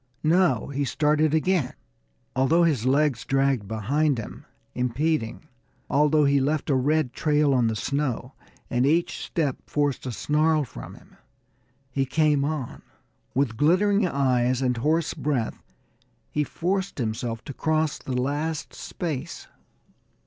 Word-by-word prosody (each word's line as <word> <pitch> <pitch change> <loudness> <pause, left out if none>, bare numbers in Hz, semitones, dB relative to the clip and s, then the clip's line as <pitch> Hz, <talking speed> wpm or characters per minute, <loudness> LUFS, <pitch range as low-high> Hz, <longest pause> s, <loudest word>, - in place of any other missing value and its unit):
No; 160 -7 +2
he 140 0 -1
started 150 +3 +2
again! 160 -4 +1 0.6
Although 145 +6 +3
his 140 -8 +1
legs 140 -2 +2
dragged 135 -6 +1
behind 135 +7 0
him, 115 - -8 0.3
impeding, 125 +2 -1 0.4
although 150 +1 +4
he 140 0 +4
left 150 +2 0
a - - +3
red 140 0 +1
trail 150 -2 +2
on 125 -3 +3
the 110 - -1
snow, 135 0 -2 0.3
and 125 +2 +1
each 165 +4 +1
step 145 -6 -1
forced 145 -3 -1
a - - -2
snarl 155 +5 +1
from 130 - -9
him, - - -19 0.7
he 135 +1 0
came 150 0 +2
on. 145 -4 -3 0.5
With 130 -5 0
glittering 195 - +3
eyes 130 -4 +1
and 125 -2 +1
hoarse 155 +6 +1
breath, 135 -7 -2 0.7
he 150 - +1
forced 190 +6 -2
himself 115 -1 -3
to 140 - -7
cross 155 +1 0
the 125 -1 -3
last 145 +4 -2
space. 160 -2 -5
145 Hz, 135 wpm, -25 LUFS, 125-155 Hz, 0.7 s, although